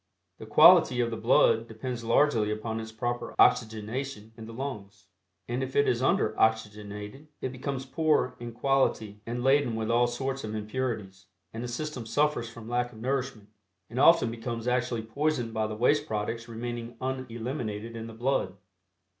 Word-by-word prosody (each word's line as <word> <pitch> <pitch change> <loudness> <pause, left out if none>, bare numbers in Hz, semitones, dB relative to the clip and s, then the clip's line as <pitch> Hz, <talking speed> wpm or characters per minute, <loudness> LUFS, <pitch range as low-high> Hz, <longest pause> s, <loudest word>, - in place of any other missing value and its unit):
The - - -9
quality 125 - +7
of 120 -1 +1
the - - -2
blood 115 0 +3
depends 115 +2 -5
largely 115 -2 +3
upon 110 +1 -3
its 110 0 -7
proper 120 +2 -3
oxygenation 110 0 +1
in 110 -1 -10
the - - -8
lungs, 105 -6 -7 0.4
and 120 +2 -2
if 130 0 -4
it 140 - +4
is 120 - +1
under 110 -4 +2
oxygenated 105 +3 -1
it 130 - -3
becomes 130 +1 -4
poor 150 -1 +1
in 120 0 -6
quality 115 -5 0
and 120 +1 -3
laden 135 -3 +3
with 110 0 -1
all 120 +1 +4
sorts 135 +2 -3
of 110 0 -4
impurities, 105 -4 -4 0.3
and 115 +2 -5
the - - -3
system 125 -1 -5
suffers 145 -4 +1
from 115 -1 -11
lack 120 +1 -1
of 110 - -13
nourishment, 125 -4 -3 0.4
and 125 - -3
often 165 -4 +6
becomes 115 0 -5
actually 120 -2 0
poisoned 120 0 -1
by 110 -1 0
the 110 - -5
waste 145 +6 +2
products 110 +2 -3
remaining 120 0 -6
uneliminated 120 -3 -4
in 115 0 -6
the 115 - -9
blood. 115 -5 -1
120 Hz, 170 wpm, -28 LUFS, 110-130 Hz, 0.4 s, quality